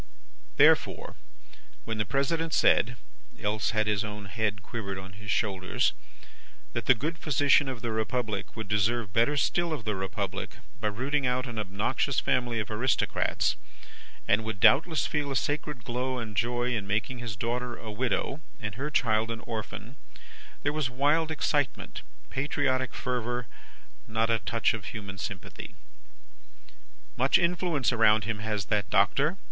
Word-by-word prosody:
Therefore -, -, +4 dB, 0.7 s
when 110 Hz, -1 st, -3 dB
the 105 Hz, -, +1 dB
President 160 Hz, -, 0 dB
said 125 Hz, +2 st, +4 dB, 0.4 s
(else 105 Hz, 0 st, 0 dB
had 110 Hz, -1 st, +1 dB
his 105 Hz, -1 st, +1 dB
own 105 Hz, -1 st, -6 dB
head 105 Hz, +1 st, -2 dB
quivered 100 Hz, -4 st, -4 dB
on 95 Hz, 0 st, -8 dB
his 100 Hz, 0 st, -10 dB
shoulders), 95 Hz, -2 st, +1 dB, 0.8 s
that 120 Hz, -, -3 dB
the 130 Hz, -, +7 dB
good 160 Hz, +7 st, -3 dB
physician 145 Hz, -2 st, +4 dB
of 125 Hz, -2 st, -6 dB
the 115 Hz, -, -1 dB
Republic 110 Hz, -1 st, -2 dB
would 110 Hz, -2 st, -5 dB
deserve 105 Hz, 0 st, +1 dB
better 120 Hz, +6 st, +3 dB
still 170 Hz, +4 st, +1 dB
of 145 Hz, -9 st, -3 dB
the 105 Hz, -2 st, 0 dB
Republic 95 Hz, -1 st, -3 dB, 0.2 s
by -, -, -1 dB
rooting 130 Hz, +6 st, 0 dB
out 125 Hz, +1 st, +1 dB
an 115 Hz, -3 st, -5 dB
obnoxious 105 Hz, +7 st, 0 dB
family 125 Hz, -2 st, +1 dB
of 110 Hz, -, -3 dB
Aristocrats, 115 Hz, +3 st, +1 dB, 0.7 s
and 105 Hz, +2 st, +4 dB
would 110 Hz, -2 st, -4 dB
doubtless 160 Hz, -, +5 dB
feel 145 Hz, -2 st, -1 dB
a -, -, -2 dB
sacred 145 Hz, -1 st, -1 dB
glow 125 Hz, +2 st, -2 dB
and 110 Hz, -3 st, -5 dB
joy 120 Hz, +4 st, +1 dB
in 105 Hz, -3 st, -3 dB
making 110 Hz, +5 st, -1 dB
his 115 Hz, -4 st, -4 dB
daughter 120 Hz, +3 st, -2 dB
a 110 Hz, -, -7 dB
widow 130 Hz, +5 st, -1 dB, 0.2 s
and 105 Hz, -4 st, -4 dB
her 140 Hz, +8 st, -3 dB
child 115 Hz, -6 st, +2 dB
an 115 Hz, -1 st, -4 dB
orphan, 115 Hz, +2 st, -6 dB, 0.7 s
there 145 Hz, -, +1 dB
was 150 Hz, -4 st, 0 dB
wild 145 Hz, +5 st, +2 dB
excitement, 150 Hz, -3 st, -1 dB, 0.3 s
patriotic 130 Hz, -3 st, 0 dB
fervour, 120 Hz, -1 st, -2 dB, 0.6 s
not 110 Hz, +1 st, +1 dB
a 115 Hz, -, +3 dB
touch 115 Hz, +1 st, +1 dB
of 110 Hz, -4 st, -5 dB
human 100 Hz, -3 st, -6 dB
sympathy. 100 Hz, -6 st, -6 dB, 1.4 s
"Much 130 Hz, +2 st, +5 dB
influence 170 Hz, -6 st, +1 dB
around 110 Hz, -2 st, +5 dB
him, 110 Hz, -1 st, -2 dB
has 105 Hz, -2 st, -2 dB
that 105 Hz, -1 st, 0 dB
Doctor?" 135 Hz, -, +3 dB
115 Hz, 150 wpm, -29 LUFS, 105-135 Hz, 1.4 s, the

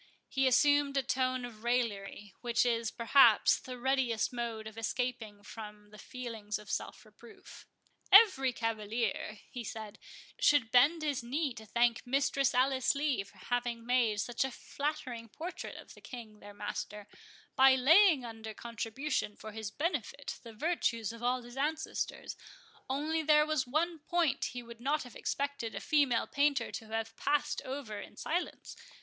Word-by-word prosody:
He 270 Hz, 0 st, +1 dB
assumed 285 Hz, +2 st, +4 dB
a 270 Hz, -, +2 dB
tone 255 Hz, -1 st, 0 dB
of 225 Hz, -2 st, -11 dB
raillery, 210 Hz, -5 st, -1 dB
which 240 Hz, 0 st, +2 dB
is, 230 Hz, -2 st, +1 dB
perhaps, 235 Hz, -1 st, +5 dB
the 255 Hz, -1 st, -8 dB
readiest 250 Hz, -3 st, +1 dB
mode 230 Hz, -2 st, -4 dB
of 220 Hz, 0 st, -8 dB
escaping 225 Hz, -3 st, -3 dB
from 210 Hz, -1 st, -10 dB
the 210 Hz, -, -13 dB
feelings 225 Hz, -5 st, -5 dB
of 210 Hz, -1 st, -10 dB
self -, -, -4 dB
reproof. 220 Hz, +2 st, -15 dB, 0.4 s
"Every 375 Hz, -, +7 dB
cavalier," 225 Hz, -2 st, -2 dB
he 245 Hz, -, -5 dB
said, 220 Hz, -1 st, -7 dB, 0.4 s
"should 280 Hz, -7 st, +4 dB
bend 300 Hz, +6 st, +5 dB
his 290 Hz, -4 st, -1 dB
knee 270 Hz, +4 st, -1 dB
to 220 Hz, -1 st, -11 dB
thank 235 Hz, +1 st, +2 dB
Mistress 275 Hz, 0 st, +1 dB
Alice 260 Hz, +1 st, +3 dB
Lee 280 Hz, -7 st, 0 dB
for 200 Hz, 0 st, -19 dB
having 240 Hz, +2 st, -2 dB
made 235 Hz, -4 st, +2 dB
such 240 Hz, +4 st, 0 dB
a 265 Hz, -, -1 dB
flattering 260 Hz, -4 st, -4 dB
portrait 335 Hz, -, -6 dB
of -, -, -11 dB
the -, -, -16 dB
King 225 Hz, -5 st, -10 dB
their 205 Hz, -, -11 dB
master, 205 Hz, 0 st, -5 dB, 0.5 s
by 265 Hz, 0 st, +7 dB
laying 310 Hz, +1 st, +6 dB
under 220 Hz, -1 st, -8 dB
contribution 230 Hz, 0 st, -3 dB
for 215 Hz, -, -9 dB
his 220 Hz, -1 st, -5 dB
benefit 285 Hz, -, -3 dB
the 230 Hz, -, -10 dB
virtues 230 Hz, -, -1 dB
of 230 Hz, -, -11 dB
all 250 Hz, +1 st, 0 dB
his 240 Hz, +1 st, -12 dB
ancestors; 310 Hz, +3 st, -2 dB, 0.5 s
only 305 Hz, +4 st, 0 dB
there 300 Hz, -1 st, +5 dB
was 310 Hz, -4 st, 0 dB
one 325 Hz, +5 st, 0 dB
point 320 Hz, -3 st, +1 dB
he 245 Hz, -1 st, -5 dB
would 235 Hz, -1 st, -12 dB
not 295 Hz, +4 st, 0 dB
have 250 Hz, -, -12 dB
expected 280 Hz, -6 st, -3 dB
a -, -, -3 dB
female 280 Hz, -2 st, +2 dB
painter 280 Hz, -4 st, +1 dB
to 225 Hz, -, -7 dB
have 225 Hz, 0 st, -3 dB
passed 295 Hz, 0 st, 0 dB
over 260 Hz, -6 st, -5 dB
in -, -, -11 dB
silence. 350 Hz, +3 st, -3 dB
245 Hz, 160 wpm, -32 LUFS, 225-280 Hz, 0.5 s, Every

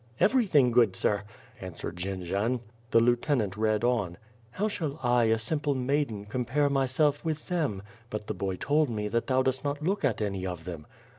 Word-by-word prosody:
Everything 185 Hz, -, +4 dB
good, 115 Hz, -5 st, +4 dB
sir 100 Hz, +1 st, +1 dB
— 125 Hz, -2 st, -23 dB
" -, -, -22 dB
answered 90 Hz, -2 st, -6 dB
Jendzian. 100 Hz, +6 st, -1 dB, 0.3 s
The 115 Hz, -, +5 dB
lieutenant 120 Hz, -, +1 dB
read 110 Hz, 0 st, +1 dB
on: 110 Hz, -8 st, +1 dB, 0.2 s
" 115 Hz, 0 st, -30 dB
How 205 Hz, +3 st, 0 dB
shall 160 Hz, -8 st, -3 dB
I, 120 Hz, -1 st, +4 dB
a 110 Hz, 0 st, +3 dB
simple 145 Hz, +5 st, -1 dB
maiden, 130 Hz, -5 st, -1 dB
compare 130 Hz, +6 st, 0 dB
my 135 Hz, -1 st, +2 dB
self 145 Hz, +3 st, +1 dB
with 155 Hz, 0 st, -3 dB
them; 150 Hz, -, -1 dB, 0.3 s
but 105 Hz, -1 st, -4 dB
the -, -, -3 dB
boy 95 Hz, -1 st, -2 dB
told 145 Hz, +8 st, +1 dB
me, 105 Hz, -2 st, -2 dB
that 115 Hz, +2 st, -1 dB
thou 130 Hz, 0 st, +3 dB
dost 130 Hz, 0 st, 0 dB
not 145 Hz, +1 st, -2 dB
look 195 Hz, +3 st, 0 dB
at 130 Hz, -6 st, +1 dB
any 100 Hz, -3 st, -2 dB
of 90 Hz, -3 st, -5 dB
them. 85 Hz, -4 st, -7 dB
120 Hz, 200 wpm, -28 LUFS, 105-145 Hz, 0.3 s, The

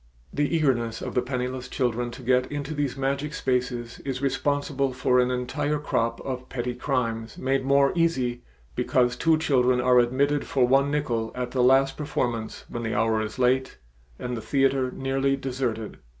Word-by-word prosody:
The 145 Hz, +3 st, 0 dB
eagerness 120 Hz, -7 st, +1 dB
of -, -, -4 dB
the 125 Hz, -, +2 dB
penniless 125 Hz, 0 st, -3 dB
children 120 Hz, -1 st, -1 dB
to 130 Hz, -, -11 dB
get 125 Hz, +2 st, +2 dB
into 145 Hz, +1 st, -4 dB
these 145 Hz, -3 st, -2 dB
magic 140 Hz, +2 st, -2 dB
spaces 125 Hz, -3 st, -2 dB
is 135 Hz, -2 st, -4 dB
responsible 140 Hz, 0 st, 0 dB
for 125 Hz, 0 st, +2 dB
an 125 Hz, 0 st, +3 dB
entire 125 Hz, +4 st, -1 dB
crop 115 Hz, -5 st, -1 dB
of 130 Hz, -1 st, -5 dB
petty 125 Hz, -1 st, -3 dB
crimes 115 Hz, -3 st, -2 dB
made 135 Hz, 0 st, 0 dB
more 140 Hz, +1 st, +4 dB
easy 130 Hz, -8 st, 0 dB, 0.3 s
because 125 Hz, -, +1 dB
two 165 Hz, -1 st, +3 dB
children 130 Hz, -5 st, +2 dB
are 125 Hz, 0 st, +5 dB
admitted 140 Hz, +4 st, +1 dB
for 130 Hz, -3 st, +2 dB
one 135 Hz, +2 st, +4 dB
nickel 120 Hz, -7 st, -1 dB
at 125 Hz, -1 st, -3 dB
the 130 Hz, -, +1 dB
last 135 Hz, +2 st, +4 dB
performance 120 Hz, -7 st, -3 dB
when 120 Hz, -, -5 dB
the 110 Hz, -1 st, -2 dB
hour 110 Hz, -1 st, +2 dB
is 110 Hz, 0 st, -5 dB
late 130 Hz, +1 st, +1 dB, 0.4 s
and 125 Hz, 0 st, -4 dB
the 115 Hz, -, -5 dB
theater 135 Hz, +2 st, +1 dB
nearly 135 Hz, +1 st, 0 dB
deserted. 125 Hz, -5 st, -3 dB
130 Hz, 170 wpm, -25 LUFS, 125-140 Hz, 0.4 s, are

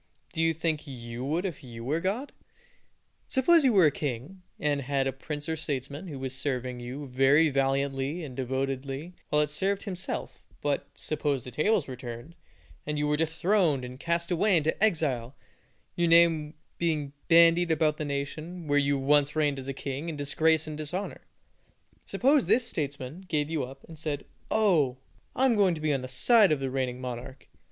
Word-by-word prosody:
Do 160 Hz, -, -1 dB
you 165 Hz, 0 st, +2 dB
think 160 Hz, -1 st, -2 dB
you 120 Hz, -2 st, -7 dB
would 165 Hz, +7 st, -1 dB
if 175 Hz, -7 st, -5 dB
you 115 Hz, -2 st, -9 dB
were 150 Hz, +5 st, 0 dB
God? 210 Hz, +11 st, -2 dB, 1.0 s
Suppose 320 Hz, +5 st, +4 dB
you 260 Hz, -, +5 dB
were 190 Hz, -6 st, +6 dB
a 150 Hz, -, +5 dB
king, 145 Hz, +7 st, -5 dB, 0.2 s
and 145 Hz, -1 st, 0 dB
had 135 Hz, 0 st, 0 dB
a 135 Hz, -, -1 dB
prince 145 Hz, +2 st, -6 dB
or 160 Hz, -, -1 dB
statesman 145 Hz, +2 st, -4 dB
who 145 Hz, -5 st, -6 dB
was 130 Hz, 0 st, -4 dB
serving 130 Hz, -2 st, -2 dB
you 130 Hz, +4 st, -6 dB
very 135 Hz, +4 st, +4 dB
valiantly 135 Hz, +3 st, 0 dB
and 135 Hz, -5 st, -7 dB
devotedly 135 Hz, +4 st, -3 dB, 0.2 s
while 150 Hz, 0 st, +3 dB
it 150 Hz, -, -3 dB
served 195 Hz, +6 st, -1 dB
himself; 185 Hz, -3 st, -4 dB, 0.2 s
but, 145 Hz, -1 st, -1 dB
suppose 145 Hz, -4 st, -2 dB
the 125 Hz, -, -8 dB
tables 175 Hz, -, +1 dB
were 130 Hz, -, -5 dB
turned, 120 Hz, +5 st, -8 dB, 0.5 s
and 150 Hz, 0 st, -3 dB
you 150 Hz, -, +1 dB
were 150 Hz, -, +2 dB
dethroned 160 Hz, -2 st, +1 dB
and 125 Hz, +1 st, -9 dB
cast 170 Hz, +2 st, -1 dB
away 185 Hz, +2 st, +3 dB
into 160 Hz, +6 st, 0 dB
exile, 140 Hz, -, +1 dB, 0.6 s
your 175 Hz, 0 st, +2 dB
name 165 Hz, -2 st, +4 dB, 0.2 s
being 150 Hz, -4 st, -1 dB
bandied 170 Hz, +1 st, +6 dB
about 155 Hz, -1 st, +2 dB
the -, -, -3 dB
nation 155 Hz, +5 st, -4 dB
where 145 Hz, -1 st, +3 dB
you 140 Hz, 0 st, +2 dB
once 145 Hz, +1 st, +3 dB
reigned 145 Hz, -3 st, +1 dB
as 135 Hz, +1 st, -6 dB
king, 140 Hz, +4 st, -4 dB
in 160 Hz, -, -4 dB
disgrace 155 Hz, +2 st, +2 dB
and 155 Hz, -1 st, -6 dB
dishonor; 180 Hz, +6 st, -4 dB, 0.9 s
suppose 275 Hz, +2 st, +3 dB
this 240 Hz, -1 st, +3 dB
statesman 145 Hz, -, -4 dB
gave 150 Hz, -2 st, -1 dB
you 155 Hz, -4 st, 0 dB
up, 135 Hz, +2 st, -9 dB
and 160 Hz, -2 st, -11 dB
said, 150 Hz, -2 st, -3 dB, 0.2 s
"Oh! 165 Hz, -12 st, +3 dB, 0.4 s
I 260 Hz, -, +3 dB
am 250 Hz, -3 st, +4 dB
going 195 Hz, -4 st, +3 dB
to -, -, -7 dB
be 155 Hz, -1 st, +1 dB
on 135 Hz, -, -1 dB
the 130 Hz, -, -5 dB
side 195 Hz, -, +5 dB
of 150 Hz, -, +2 dB
the 135 Hz, -1 st, -2 dB
reigning 130 Hz, -2 st, -2 dB
monarch. 125 Hz, +1 st, -7 dB
150 Hz, 185 wpm, -28 LUFS, 135-170 Hz, 1.0 s, were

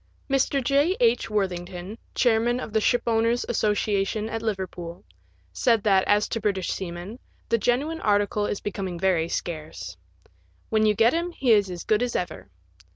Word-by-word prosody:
Mr. 275 Hz, 0 st, +1 dB
J. 285 Hz, +8 st, +2 dB
H. 235 Hz, -1 st, +2 dB
Worthing 185 Hz, -4 st, -1 dB
ton, 180 Hz, +4 st, -7 dB, 0.2 s
chairman 240 Hz, 0 st, +2 dB
of 225 Hz, -, -7 dB
the 220 Hz, -, +2 dB
Shipowners* 235 Hz, 0 st, +2 dB
Associations 210 Hz, -1 st, 0 dB
at 225 Hz, -, -3 dB
Liver 205 Hz, -4 st, -1 dB
pool, 170 Hz, -2 st, -9 dB, 0.5 s
said 230 Hz, -4 st, +2 dB
that, 195 Hz, -3 st, +4 dB
as 205 Hz, +1 st, +3 dB
to 225 Hz, -, -2 dB
British 195 Hz, -3 st, -1 dB
seamen, 185 Hz, +5 st, -6 dB, 0.3 s
the 230 Hz, -, +2 dB
genuine 280 Hz, +9 st, 0 dB
article 205 Hz, 0 st, +1 dB
is 205 Hz, -, -3 dB
becoming 190 Hz, -3 st, -4 dB
very 170 Hz, -3 st, +1 dB
scarce; 155 Hz, -, -5 dB, 0.4 s
" 85 Hz, 0 st, -36 dB
when 215 Hz, 0 st, +3 dB
you 210 Hz, -, +3 dB
get 230 Hz, +3 st, +4 dB
him 340 Hz, +2 st, 0 dB
he 260 Hz, -6 st, +1 dB
is 205 Hz, -3 st, +5 dB
as 175 Hz, -1 st, -6 dB
as -, -, -8 dB
good 215 Hz, +1 st, +2 dB
as 245 Hz, -1 st, -1 dB
ever." 175 Hz, -, -4 dB
210 Hz, 175 wpm, -25 LUFS, 185-235 Hz, 0.5 s, is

